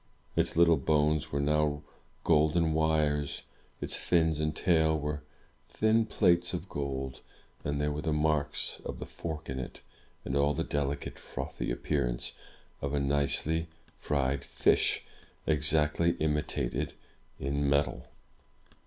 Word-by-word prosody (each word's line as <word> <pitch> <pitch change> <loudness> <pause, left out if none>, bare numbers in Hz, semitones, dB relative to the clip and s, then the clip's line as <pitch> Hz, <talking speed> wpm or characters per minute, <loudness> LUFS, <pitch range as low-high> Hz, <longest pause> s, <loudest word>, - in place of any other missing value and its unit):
Its - - +1
Httle 85 -4 +5
bones 75 0 +2
were 70 - 0
now 75 0 +1 0.4
golden 80 +1 +3
wires; 75 -2 +1 0.4
its - - -1
fins 80 -3 +2
and 75 0 0
tail 80 -3 +3
were 75 0 -3 0.5
thin 110 +1 +2
plates 90 -4 +3
of - - -5
gold; 65 -2 -4 0.4
and 70 0 -1
there 75 0 +1
were 75 +1 -3
the 80 - -1
marks 75 -1 0
of - - -5
the - - -6
fork 80 -1 -6
in 65 0 -4
it, 65 - -7 0.4
and 65 - -2
all 70 +1 +3
the - - 0
delicate, 70 0 -2
frothy - - -5
appearance - - -1 0.5
of 70 +1 -1
a - - +2
nicely 70 +4 +1 0.3
fried 70 -2 0
fish, - - +2 0.4
exactly 75 +2 +3
imitated 75 -6 -1 0.4
in 70 +1 0
metal. 70 -3 +1
75 Hz, 130 wpm, -30 LUFS, 70-80 Hz, 0.5 s, Httle